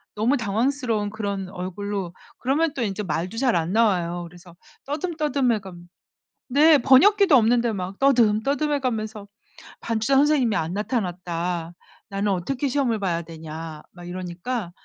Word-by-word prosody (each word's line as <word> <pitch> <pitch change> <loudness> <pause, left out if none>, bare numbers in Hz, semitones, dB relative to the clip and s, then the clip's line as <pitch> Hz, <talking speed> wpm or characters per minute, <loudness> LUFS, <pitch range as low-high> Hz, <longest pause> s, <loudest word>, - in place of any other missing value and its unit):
너무 225 +6 +2
당황스러운 230 -1 0
그런 200 -3 -3
얼굴로 190 0 -5 0.3
그러면 290 +4 +1
또 270 - -4
인제 210 -2 -2
말도 180 +4 -3
잘 250 -1 +2
안 165 0 0
나와요. 180 -6 +1
그래서 175 0 -16 0.3
떠듬떠듬해가 280 - -1 0.8
네. 300 +4 +6
번역기도 345 - +6
없는데 235 0 +3
막 190 0 -5
떠듬떠듬해 275 +3 +2
가면서 220 -5 -3 0.5
"반주자 230 +3 0
선생님이 270 -5 +3
안 165 -3 -1
나타났다. 180 -5 -3 0.4
나는 200 0 -1
어떻게 245 +10 -1
시험을 255 -5 0
봐야 175 -4 -1
되냐." 160 -1 -8
막 175 -1 -12
이러니까 180 +4 -4
215 Hz, 325 characters per minute, -24 LUFS, 180-265 Hz, 0.8 s, 네